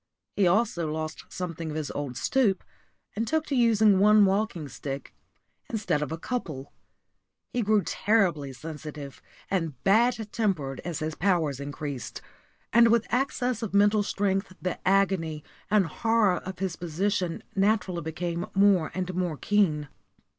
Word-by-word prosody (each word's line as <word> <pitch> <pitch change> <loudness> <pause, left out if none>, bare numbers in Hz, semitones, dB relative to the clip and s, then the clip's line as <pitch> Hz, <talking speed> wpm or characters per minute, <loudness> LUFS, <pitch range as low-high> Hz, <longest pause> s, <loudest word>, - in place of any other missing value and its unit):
He 195 -3 +3
also 175 -5 +1
lost 155 0 -5
something 165 -3 -5
of 150 - -5
his 155 -2 -3
old 140 -4 -4
stoop, 220 - +1 0.5
and 225 +2 -1
took 315 +3 0
to 280 - -2
using 220 -5 +4
one 210 +1 +6
walking 195 -5 0
stick 140 +1 -6 0.6
instead 195 -10 -1
of 150 - -3
a 160 - -3
couple. 155 - -5 0.8
He 245 - +1
grew 210 -2 +3
terribly 175 -10 +1
sensitive 150 -1 -8 0.3
and 165 -9 -1
bad 230 +5 +4
tempered 160 - -1
as 170 -3 -4
his 155 0 -2
powers 160 -7 +1
increased; 145 -2 -5 0.5
and 235 +1 +7
with 230 -1 +3
access 250 -2 0
of 215 -3 -3
mental 205 +1 +5
strength 195 -1 -1
the 180 - -3
agony 185 -6 +2 0.3
and 205 -2 +4
horror 220 +2 +2
of 190 0 -7
his 185 -2 -2
position 180 +1 -2
naturally 195 -3 +1
became 170 +2 -3
more 195 -5 +4
and 185 0 -2
more 175 -4 -1
keen. 160 -8 +1
185 Hz, 145 wpm, -27 LUFS, 155-210 Hz, 0.8 s, and